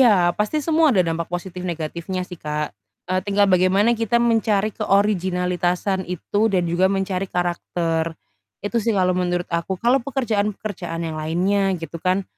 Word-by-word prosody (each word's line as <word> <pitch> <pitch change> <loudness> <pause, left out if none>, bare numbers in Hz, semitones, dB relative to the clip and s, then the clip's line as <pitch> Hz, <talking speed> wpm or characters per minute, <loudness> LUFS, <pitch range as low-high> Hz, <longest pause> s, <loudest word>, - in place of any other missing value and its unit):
iya, 190 -8 +5
pasti 210 +9 0
semua 320 -1 +4
ada 185 - +5
dampak 165 0 -2
positif 180 0 -5
negatifnya 170 +2 -3
sih 180 -2 -10
Kak. 150 -2 -3 0.3
Eee, 185 0 0
tinggal 200 0 +3
bagaimana 185 +5 +4
kita 230 +1 0
mencari 220 -3 +2
keoriginalitasan 185 -1 0
itu 205 +5 0
dan 185 -3 +1
juga 180 +3 +2
mencari 195 -1 -1
karakter. 170 -2 -1 0.5
Itu 230 +3 0
sih 220 -1 0
kalau 185 -1 +3
menurut 175 -1 0
aku. 170 +3 -1
Kalau 245 +5 +3
pekerjaan-pekerjaan 210 -9 -2
yang 160 -1 -4
lainnya 190 +4 +1
gitu 165 0 -7
kan, 185 +2 +1
185 Hz, 150 wpm, -22 LUFS, 175-205 Hz, 0.5 s, iya